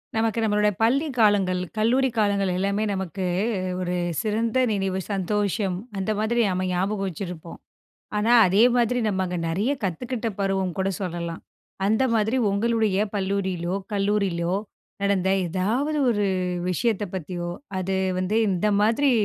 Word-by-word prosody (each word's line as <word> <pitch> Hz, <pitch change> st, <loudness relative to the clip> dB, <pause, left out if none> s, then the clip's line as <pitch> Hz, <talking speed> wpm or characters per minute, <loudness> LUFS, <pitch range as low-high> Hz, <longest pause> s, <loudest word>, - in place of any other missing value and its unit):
நமக்கு 225 Hz, 0 st, +1 dB
நம்மளோட 210 Hz, -1 st, +3 dB
பள்ளி 275 Hz, +7 st, +3 dB
காலங்கள், 195 Hz, -4 st, +3 dB, 0.2 s
கல்லூரி 255 Hz, +5 st, +3 dB
காலங்கள் 200 Hz, -3 st, +2 dB
எல்லாமே 200 Hz, +2 st, 0 dB
நமக்கு 190 Hz, 0 st, -4 dB, 0.6 s
ஒரு 180 Hz, 0 st, -1 dB, 0.3 s
சிறந்த 225 Hz, +3 st, 0 dB
நினைவு, 195 Hz, -2 st, -1 dB
சந்தோஷம். 200 Hz, 0 st, 0 dB, 0.2 s
அந்த 195 Hz, +2 st, -1 dB
மாதிரி 235 Hz, +2 st, +1 dB
நம்ம 185 Hz, 0 st, -1 dB
ஞாபகம் 195 Hz, +2 st, -1 dB
வச்சிருப்போம். 170 Hz, -1 st, -7 dB, 0.6 s
ஆனா, 215 Hz, +3 st, +2 dB
அதே 195 Hz, +4 st, +4 dB
மாதிரி 245 Hz, 0 st, +2 dB
நம்ம 190 Hz, -3 st, 0 dB
அங்க 180 Hz, 0 st, -3 dB
நிறைய 195 Hz, +10 st, 0 dB
கத்துக்கிட்ட 230 Hz, +6 st, -2 dB
பருவம் 190 Hz, -2 st, 0 dB
கூட 190 Hz, -, +1 dB
சொல்லலாம். 170 Hz, -3 st, -4 dB, 0.4 s
அந்த 220 Hz, +5 st, +2 dB
மாதிரி 220 Hz, +3 st, +1 dB
உங்களுடைய 220 Hz, -1 st, +1 dB, 0.2 s
பள்ளியிலோ 190 Hz, -3 st, -1 dB, 0.2 s
கல்லூரியிலோ! 195 Hz, -4 st, 0 dB, 0.5 s
நடந்த 195 Hz, -2 st, +1 dB, 0.2 s
எதாவது 230 Hz, -, 0 dB
ஒரு 205 Hz, -3 st, +1 dB, 0.4 s
விஷயத்த 215 Hz, +2 st, 0 dB
பத்தியோ! 175 Hz, 0 st, -4 dB, 0.3 s
அது 190 Hz, +1 st, -1 dB, 0.2 s
வந்து 185 Hz, +4 st, 0 dB
"இந்த 190 Hz, +3 st, +1 dB
மாதிரி 230 Hz, +7 st, +3 dB
200 Hz, 130 wpm, -24 LUFS, 185-220 Hz, 0.6 s, அதே